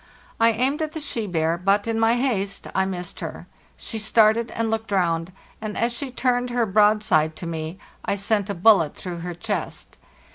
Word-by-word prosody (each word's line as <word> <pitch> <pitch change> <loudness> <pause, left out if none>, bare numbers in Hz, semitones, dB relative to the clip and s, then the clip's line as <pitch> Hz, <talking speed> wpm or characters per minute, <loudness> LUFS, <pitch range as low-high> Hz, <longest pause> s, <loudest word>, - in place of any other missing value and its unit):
I 230 0 +6
aimed 255 +7 0
at 310 -1 -2
the 315 - -4
she 235 -7 -3
bear, 165 -1 0
but, 195 +3 +2
in 225 -1 -1
my 225 +1 +4
haste, 220 -6 -1
I 190 - +2
missed 180 -2 -5
her. - - -6 0.3
She 225 - -5
started 220 +2 +3
and 225 -1 -2
looked 225 -1 -3
round; 170 -2 +1 0.3
and 215 -1 -4
as 235 +1 +1
she 270 +3 -4
turned 250 -1 0
her 240 -1 +1
broadside 205 -6 +3
to - - -7
me 160 +1 -4 0.3
I - - 0
sent 205 0 0
a 200 - -2
bullet 175 -4 +4
through 175 -2 -6
her 175 0 -5
chest. 195 -1 -5
210 Hz, 190 wpm, -23 LUFS, 180-230 Hz, 0.3 s, I